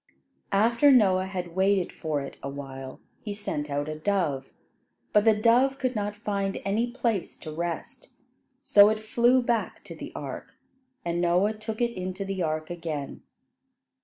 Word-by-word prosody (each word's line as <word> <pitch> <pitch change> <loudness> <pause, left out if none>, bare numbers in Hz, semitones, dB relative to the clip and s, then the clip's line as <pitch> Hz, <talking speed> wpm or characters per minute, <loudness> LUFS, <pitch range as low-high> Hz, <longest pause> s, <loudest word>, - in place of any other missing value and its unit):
After 235 +7 +4
Noah 190 -7 +4
had 180 -3 -5
waited 190 -1 +2
for 155 -3 -2
it 140 - -7
awhile, 135 -1 -7 0.2
he 205 -2 -5
sent 150 -8 -4
out 145 +1 -2
a 155 - -3
dove; 155 -8 -1 0.6
but 210 +1 +4
the 220 -1 +6
dove 245 +5 +3
could 255 -2 -1
not 205 -1 -2
find 200 -2 -2
any 220 +5 +1
place 235 -6 -2
to 155 - -7
rest, 170 - -5 0.5
so 210 -7 +7
it 215 0 0
flew 240 +3 +3
back 235 -2 -1
to - - -9
the - - -8
ark, - - -7 0.5
and 170 0 -1
Noah 180 +5 +3
took 215 +1 -6
it 235 0 +1
into 185 +2 -4
the 195 -1 -3
ark 155 0 -2
again. 160 -5 -5
195 Hz, 160 wpm, -27 LUFS, 170-220 Hz, 0.6 s, so